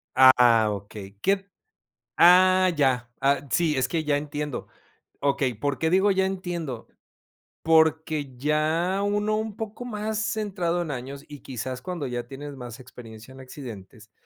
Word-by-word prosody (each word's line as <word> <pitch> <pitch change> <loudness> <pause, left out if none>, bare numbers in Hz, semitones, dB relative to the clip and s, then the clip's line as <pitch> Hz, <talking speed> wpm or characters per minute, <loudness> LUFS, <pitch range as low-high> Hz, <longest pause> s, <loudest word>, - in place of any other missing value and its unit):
Ah, 125 -4 +6
okey, 100 -1 -8
¿qué? 195 0 +1 0.7
Ah, 185 +1 +6
ya. 130 -5 +1
Ah, 140 +1 +1
sí, 160 -4 +1
es 130 -1 +1
que 160 +4 -2
ya 150 -2 +1
entiendo. 145 -1 -4 0.5
Okey, 140 -3 0
¿por 140 +5 -2
qué 160 - +1
digo 190 +3 +4
"ya 190 -1 +2
entiendo"? 175 -10 -5 0.8
Porque 160 -3 +2
ya 155 +7 0
uno, 205 +1 0
un 220 -1 -4
poco 220 +2 -6
más 215 -2 -3
centrado 200 -5 -1
en 165 -3 -4
años 135 +2 -6
y 145 -1 -9
quizás 130 0 -6
cuando 170 -1 -4
ya 120 -1 -4
tienes 145 +1 -8
más 120 -1 -9
experiencia 115 -2 -12
en 135 - -13
accidentes 110 -5 -11
145 Hz, 145 wpm, -25 LUFS, 130-185 Hz, 0.8 s, Ah